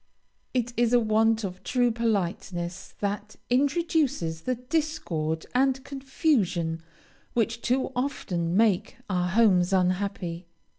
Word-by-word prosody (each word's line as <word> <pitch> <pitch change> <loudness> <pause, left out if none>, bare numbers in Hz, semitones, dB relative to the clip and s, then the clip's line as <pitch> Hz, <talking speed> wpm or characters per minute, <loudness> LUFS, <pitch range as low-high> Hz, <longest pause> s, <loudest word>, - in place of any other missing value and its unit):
It 245 -1 0
is 240 0 +3
a 245 - +7
want 220 0 +2
of 185 -1 -5
true 245 -1 +2
politeness 190 -5 -2
that 205 +1 -3 0.2
introduces 280 - +1
the 255 +8 -1
discord 230 - -2
and 265 +1 +2
confusion 245 - 0 0.5
which 230 0 0
too 255 +3 0
often 180 -10 -1
make 220 +2 +2
our 180 -1 +1
homes 190 -3 +4
unhappy. 185 -2 0
220 Hz, 110 wpm, -27 LUFS, 180-250 Hz, 0.5 s, a